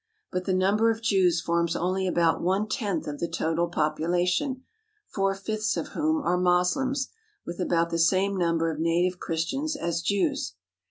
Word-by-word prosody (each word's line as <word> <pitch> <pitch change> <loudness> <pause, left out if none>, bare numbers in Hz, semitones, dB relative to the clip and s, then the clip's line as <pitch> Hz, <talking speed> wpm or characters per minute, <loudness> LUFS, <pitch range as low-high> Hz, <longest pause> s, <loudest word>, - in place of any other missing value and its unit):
But 185 0 -2
the 190 - 0
number 200 +5 +3
of 225 0 -2
Jews 180 -6 +3
forms 170 0 0
only 185 +2 0
about 170 -2 +2
one 190 +4 +1
tenth 205 - -2
of 145 -1 -5
the 170 - -1
total 165 0 0
population, 175 - 0 0.4
four 195 -1 -1
fifths 215 +2 -2
of - - -3
whom 310 -1 0
are 180 -6 +1
Moslems, 180 +10 +1 0.4
with 170 +1 -6
about 170 -2 +1
the 165 - -1
same 190 +4 +3
number 165 -2 +1
of 155 - -6
native 175 +2 +1
Christians 270 - -2
as 170 - -2
Jews. 190 - 0
180 Hz, 165 wpm, -26 LUFS, 170-200 Hz, 0.4 s, number